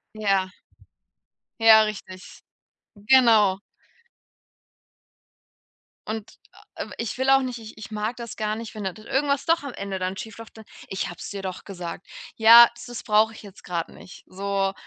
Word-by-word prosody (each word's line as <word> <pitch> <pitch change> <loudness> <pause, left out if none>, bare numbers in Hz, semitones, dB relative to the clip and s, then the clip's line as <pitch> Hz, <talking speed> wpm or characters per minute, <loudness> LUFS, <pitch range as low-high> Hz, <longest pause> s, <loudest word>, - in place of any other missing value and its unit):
Ja. 195 -3 0 1.1
Ja 220 -1 +8
richtig, 195 -3 -8 0.6
genau. 210 -4 +4 2.5
Und, 220 -1 -5 0.4
äh, - - -5
ich 230 0 -4
will 265 +1 +2
auch 270 0 +6
nicht 250 -2 -4
ich 220 -1 -12
ich 215 - -10
mag 215 +3 -3
das 235 -2 -8
gar 215 0 -2
nicht, 230 -1 -8
wenn 210 -2 -6
d 190 - -2
da 215 - -15
irgendwas 280 +1 0
doch 330 0 +2
am 280 -3 -6
Ende 195 -1 -5
dann 185 +1 -3
schief 220 +1 -8
läuft, 225 0 -12
dann: 220 - -12 0.2
„Ich 190 - -3
habe 175 - -9
es - - -7
dir 200 -1 -6
doch 185 -1 -6
gesagt.” 175 -2 -8 0.3
Ja, 230 +1 +9
das 235 - -12
s 245 - -7
brauche 215 +1 +3
ich 225 - -13
jetzt 200 -2 -14
grad 170 -2 -3
nicht. - - -14
So 195 0 -2
215 Hz, 170 wpm, -24 LUFS, 195-230 Hz, 2.5 s, Ja